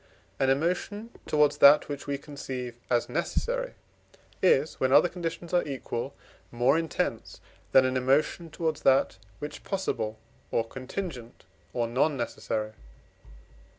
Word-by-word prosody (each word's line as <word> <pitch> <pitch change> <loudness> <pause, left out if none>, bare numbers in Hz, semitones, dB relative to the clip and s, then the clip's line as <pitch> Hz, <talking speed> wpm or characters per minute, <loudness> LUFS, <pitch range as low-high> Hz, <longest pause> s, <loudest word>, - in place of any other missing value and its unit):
An 135 - +3
emotion 180 +10 -1 0.2
towards 150 -1 +3
that 145 +2 +8
which 145 0 -6
we 140 0 -1
conceive 130 -4 -6
as 120 -1 +2
necessary - - -2 0.7
is, 155 -5 +3
when 130 - +2
other 145 +5 +7
conditions 170 -1 -5
are 175 - +4
equal, 135 -1 -4 0.3
more 120 +4 +3
intense 165 0 -2 0.3
than 130 -1 +6
an 130 0 0
emotion 140 +6 +1
towards 160 -2 -2
that 135 -7 +3 0.2
which 150 +7 -7
possible, 115 - -2 0.3
or 115 0 0
contingent, 130 -1 -6 0.3
or 120 -1 0
non 135 +5 +1
necessary. 110 -2 -3
140 Hz, 125 wpm, -28 LUFS, 125-165 Hz, 0.7 s, that